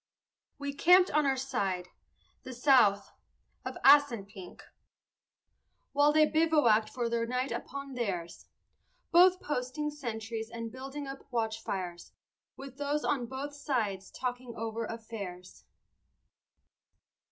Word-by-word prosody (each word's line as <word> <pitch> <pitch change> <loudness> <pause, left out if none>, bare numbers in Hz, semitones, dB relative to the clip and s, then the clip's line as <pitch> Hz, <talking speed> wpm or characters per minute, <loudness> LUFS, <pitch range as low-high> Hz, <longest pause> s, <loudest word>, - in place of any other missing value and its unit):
We 285 0 -4
camped 360 +5 +5
on 300 -1 +2
our 265 -1 +1
side 190 -9 -2 0.5
the 260 - -8
south 240 -6 +4 0.5
of - - -6
Assunpink, 230 -10 +3 1.3
While 290 +1 +4
they 310 0 +5
bivouacked 300 -10 +3
for 240 +1 -2
the 230 0 -1
night 250 +2 -2
upon 275 -1 -6
theirs; 185 -9 -4 0.6
Both 365 +1 +6
posting 295 +1 -3
sentries 225 -5 -5
and 230 -1 -6
building 270 +3 -7
up 270 0 -9
watchfires, 220 -7 -4 0.4
With 270 -1 -10
those 290 +1 -1
on 255 -5 0
both 270 +3 -6
sides 225 -10 -2
talking 250 -1 -5
over 225 0 -3
affairs. 205 -6 -8
250 Hz, 110 wpm, -30 LUFS, 220-285 Hz, 1.3 s, Both